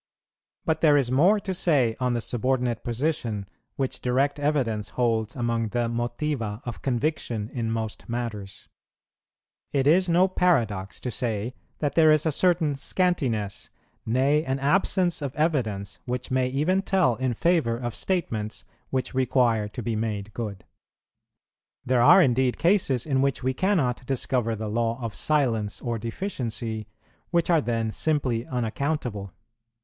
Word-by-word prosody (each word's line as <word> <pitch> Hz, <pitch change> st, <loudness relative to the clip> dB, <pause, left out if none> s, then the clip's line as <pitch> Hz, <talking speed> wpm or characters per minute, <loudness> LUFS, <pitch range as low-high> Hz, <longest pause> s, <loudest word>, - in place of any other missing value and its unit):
But 160 Hz, -1 st, 0 dB
there 150 Hz, -3 st, +5 dB
is 130 Hz, -3 st, +1 dB
more 180 Hz, +11 st, +4 dB
to 190 Hz, -1 st, -4 dB
say 140 Hz, -11 st, +2 dB
on 125 Hz, -1 st, +1 dB
the 120 Hz, -, -1 dB
subordinate 125 Hz, 0 st, 0 dB
position 120 Hz, -5 st, -2 dB, 0.3 s
which 135 Hz, -2 st, -2 dB
direct 135 Hz, +4 st, +1 dB
evidence 130 Hz, -8 st, 0 dB
holds 115 Hz, -3 st, +1 dB
among 115 Hz, -2 st, -1 dB
the 120 Hz, +1 st, -1 dB
motiva 120 Hz, -2 st, -2 dB
of 120 Hz, -2 st, -6 dB
conviction 125 Hz, -4 st, -2 dB
in 115 Hz, -3 st, -2 dB
most 110 Hz, 0 st, -4 dB
matters. 110 Hz, -5 st, -5 dB, 1.0 s
It 135 Hz, -2 st, +1 dB
is 175 Hz, +5 st, +4 dB
no 175 Hz, +3 st, +4 dB
paradox 115 Hz, -, 0 dB
to 125 Hz, -, -3 dB
say 115 Hz, +1 st, -2 dB, 0.2 s
that 145 Hz, -3 st, -1 dB
there 155 Hz, 0 st, +6 dB
is 155 Hz, 0 st, +3 dB
a 160 Hz, -, +2 dB
certain 165 Hz, -1 st, +2 dB
scantiness, 135 Hz, -, -1 dB, 0.3 s
nay 135 Hz, +6 st, +2 dB
an 130 Hz, -1 st, -1 dB
absence 175 Hz, +4 st, +2 dB
of 140 Hz, -1 st, -4 dB
evidence, 115 Hz, -, -1 dB
which 125 Hz, 0 st, -4 dB
may 130 Hz, -1 st, +2 dB
even 155 Hz, +9 st, +1 dB
tell 185 Hz, -11 st, +2 dB
in 130 Hz, -2 st, -1 dB
favour 160 Hz, -7 st, +2 dB
of 120 Hz, -1 st, -4 dB
statements 110 Hz, -, -2 dB, 0.2 s
which 130 Hz, -1 st, -2 dB
require 125 Hz, -4 st, +2 dB
to 120 Hz, +3 st, -7 dB
be 115 Hz, 0 st, -1 dB
made 105 Hz, -2 st, -3 dB
good. 105 Hz, -5 st, -5 dB, 1.2 s
There 125 Hz, -1 st, +2 dB
are 180 Hz, +9 st, +8 dB
indeed 130 Hz, -2 st, +2 dB
cases 170 Hz, -, +2 dB
in 135 Hz, -3 st, +1 dB
which 135 Hz, -2 st, 0 dB
we 130 Hz, +1 st, +1 dB
cannot 140 Hz, -8 st, 0 dB
discover 125 Hz, -3 st, 0 dB
the 110 Hz, 0 st, -5 dB
law 115 Hz, +2 st, -1 dB
of 115 Hz, -3 st, -4 dB
silence 115 Hz, -9 st, 0 dB
or 115 Hz, -2 st, -3 dB
deficiency, 115 Hz, -, -4 dB, 0.4 s
which 170 Hz, 0 st, +1 dB
are 165 Hz, -2 st, +4 dB
then 115 Hz, -3 st, -1 dB
simply 130 Hz, -5 st, 0 dB
unaccountable. 120 Hz, -, -2 dB
125 Hz, 145 wpm, -25 LUFS, 115-150 Hz, 1.2 s, are